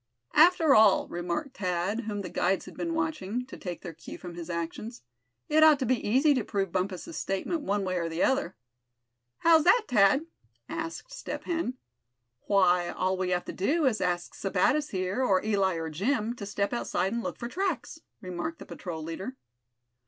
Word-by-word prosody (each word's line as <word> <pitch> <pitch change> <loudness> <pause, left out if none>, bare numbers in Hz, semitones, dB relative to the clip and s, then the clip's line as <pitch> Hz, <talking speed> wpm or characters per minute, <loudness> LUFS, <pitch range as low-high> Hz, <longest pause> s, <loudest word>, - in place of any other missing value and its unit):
"After 325 -2 +6
all," 215 -5 +6
remarked 175 - -4
Thad, 185 +4 -1
whom 205 -2 -3
the 180 - -5
guides 185 +3 0
had - - -11
been 335 -1 -2
watching, 250 -8 -2
to 265 - -10
take 175 -2 -7
their 175 -3 -6
cue - - -10
from 175 -2 -9
his 170 0 -8
actions, 170 - -5 0.4
"it 310 +1 +3
ought 310 -2 +8
to 265 - -2
be 250 0 +1
easy 270 +7 +4
to 255 -5 0
prove 195 -3 -2
Bumpus' 190 - -3
statement 195 - -2
one 205 -6 -1
way 185 -1 -1
or 165 -1 -2
the 165 +1 -1
other." 265 -9 +1 0.8
"How's 325 -2 +5
that, 430 +6 +6
Thad?" 245 +5 +4 0.4
asked 330 +10 -5
Step - - -6
Hen. 330 -7 -2 0.7
"Why, 180 -3 +3
all 185 0 0
we 185 -1 -1
have 180 -1 0
to - - -6
do 295 - +1
is 240 -5 +2
to - - +1
ask 175 -1 -2
Sebattis 205 +10 +1
here, 190 +6 -1
or 195 -5 +2
Eli, 195 -4 +2
or 165 -1 -4
Jim, 220 - 0
to 200 - -6
step 200 +2 -1
outside 195 -4 -1
and 235 - -1
look - - -4
for 235 - -5
tracks!" 350 +1 -3 0.2
remarked 185 - -4
the - - -10
patrol 165 -4 -6
leader. 185 +10 -5
205 Hz, 190 wpm, -28 LUFS, 180-280 Hz, 0.8 s, ought